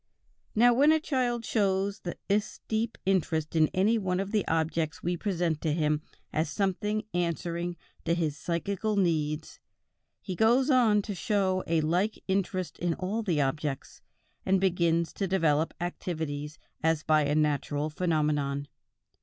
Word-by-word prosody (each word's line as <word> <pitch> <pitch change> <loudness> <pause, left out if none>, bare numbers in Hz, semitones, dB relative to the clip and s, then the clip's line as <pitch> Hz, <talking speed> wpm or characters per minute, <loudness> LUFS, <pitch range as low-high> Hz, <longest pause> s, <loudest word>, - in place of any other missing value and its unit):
Now 240 +2 +6
when 285 +5 +5
a 315 - +4
child 255 -6 0
once - - -9
shows 200 -1 +1 0.3
this 205 +1 0
deep 220 +1 -1
interest 165 -5 0
in 155 -1 +5
any 205 +6 +2
one 185 -2 -1
of 195 +1 -3
the 210 -3 0
objects 160 -1 -1
we 175 +1 0
present 175 -4 -1
to 155 -3 0
him 150 -1 +1 0.3
as 155 0 0
something 210 +4 -1
answering 170 0 -2 0.3
to 170 0 +2
his 160 -4 -1
psychical 195 +7 -2
needs, 160 -5 0 0.6
he 190 - -5
goes 245 - +4
on 220 -5 +4
to 205 - -4
show 190 -2 0
a 165 -1 +2
like 180 +8 +1
interest 185 -3 -1
in 170 -2 0
all 200 +5 -2
the 175 -9 +1
objects, 140 0 -3 0.4
and 190 0 +2
begins 170 -3 +1
to 195 - -2
develop 165 -4 +2
activities 155 -4 -4 0.2
as 160 -1 +1
by 155 -1 +3
a 145 +1 +1
natural 150 0 0
phenomenon. 150 -4 0
175 Hz, 150 wpm, -29 LUFS, 155-200 Hz, 0.6 s, Now